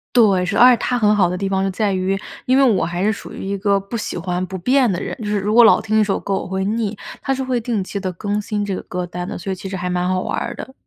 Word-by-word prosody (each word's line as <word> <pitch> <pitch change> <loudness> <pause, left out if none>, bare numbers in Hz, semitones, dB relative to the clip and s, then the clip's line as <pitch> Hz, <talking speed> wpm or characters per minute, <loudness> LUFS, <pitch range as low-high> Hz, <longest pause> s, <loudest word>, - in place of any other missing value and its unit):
对， 200 -6 +4
是， 180 - -2
而 250 +1 +8
且 245 - +4
它 250 - -1
很 210 -3 +3
好 195 -4 +4
的 180 - -2
地 195 +1 -2
方 190 0 0
就 195 - 0
在 205 +2 0
于， 190 0 0 0.3
因 255 - +3
为 275 - +5
我 215 -10 +3
还 175 +2 -2
是 215 - +3
属 210 - -8
于 - - -7
一 200 +1 -2
个 200 0 +2
不 200 +4 -6
喜 215 - -4
欢 180 +1 -2
不 190 - -8
变 255 +6 +3
的 180 - -2
人， - - -5
就 225 - -7
是 210 0 0
如 210 +3 -1
果 240 - +8
老 225 - +6
听 220 0 +1
一 - - +5
首 200 -2 0
歌 195 - -2
我 - - -3
会 190 +1 -2
腻， 215 +1 -1 0.2
它 270 - -1
是 265 0 -2
会 255 -2 0
定 225 -4 -2
期 200 +2 -5
地 185 -1 -3
更 205 +4 -2
新 210 0 -2
这 200 -2 -2
个 - - -5
歌 180 -1 -4
单 175 +1 -5
的， - - -5
所 190 +3 -4
以 - - -2
其 185 +1 -8
实 190 - -5
还 180 -1 -3
蛮 180 0 0
好 185 0 0
玩 - - -3
儿 - - -3
的。 265 - -9
200 Hz, 355 characters per minute, -20 LUFS, 185-220 Hz, 0.3 s, 而